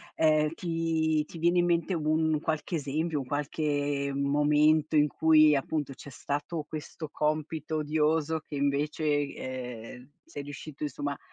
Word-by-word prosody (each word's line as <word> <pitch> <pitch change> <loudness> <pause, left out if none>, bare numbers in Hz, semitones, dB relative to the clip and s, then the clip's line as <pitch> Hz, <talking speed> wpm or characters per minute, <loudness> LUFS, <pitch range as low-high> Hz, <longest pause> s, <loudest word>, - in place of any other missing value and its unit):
Ehm, 155 -1 +3
ti 165 -2 0
ti 165 - -11
viene 175 +2 +3
in 175 - +3
mente 170 +2 +1
un 155 0 +1
qualche 160 +2 -2
esempio, 155 +2 -1
un 135 - -5
qualche 145 0 -1
momento 150 +2 +3
in 150 0 +5
cui 155 -1 +5
appunto 140 0 -2
c'è 140 - -11
stato 145 +4 -4
questo 155 0 -7
compito 155 +1 -1
odioso 155 +1 +1
che - - -7
invece, 145 +2 0 0.3
ehm, 125 0 -7
sei 145 - -8
riuscito 145 +1 -8
insomma 145 -1 -3
150 Hz, 140 wpm, -29 LUFS, 145-160 Hz, 0.3 s, in